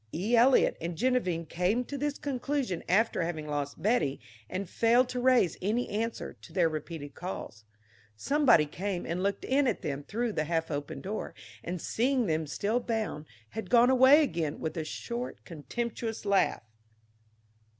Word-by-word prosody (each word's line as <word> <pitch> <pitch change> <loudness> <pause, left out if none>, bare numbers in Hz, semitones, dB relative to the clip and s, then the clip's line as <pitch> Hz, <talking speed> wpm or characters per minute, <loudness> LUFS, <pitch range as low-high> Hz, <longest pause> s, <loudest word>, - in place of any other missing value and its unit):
E. 205 +9 0
Eliot 250 +3 +5
and 170 0 -4
Geneviève 185 -9 0
came 185 +10 0
to 285 - -6
this 290 +1 -2
conclusion 270 - -2
after 215 +4 +3
having 165 -2 -3
lost 145 -1 -3
Betty 170 - +1 0.3
and 190 +1 -3
failed 235 +6 +3
to 250 - -3
raise 245 -9 +3
any 220 +6 0
answer 225 +2 -3
to - - -13
their 180 -3 +3
repeated 155 -2 -6
calls. 110 - -7 0.5
Somebody 250 - +4
came 180 +4 -4
and 170 +2 -2
looked 200 +1 -1
in 270 +1 +2
at 230 - -1
them 145 -1 -3
through 225 +8 -2
the 155 - -1
half 165 0 -1
open 145 -1 -4
door, 210 +3 -5 0.3
and, 180 +1 -4
seeing 250 - +1
them 155 -3 -1
still 210 +10 0
bound, 220 -10 -3 0.2
had 220 - -6
gone 245 +1 +6
away 260 +4 +7
again 165 - -2
with 160 - -3
a 160 - -2
short, 235 +10 -5
contemptuous 225 +7 -4
laugh. 200 - +2
200 Hz, 160 wpm, -29 LUFS, 165-245 Hz, 0.5 s, away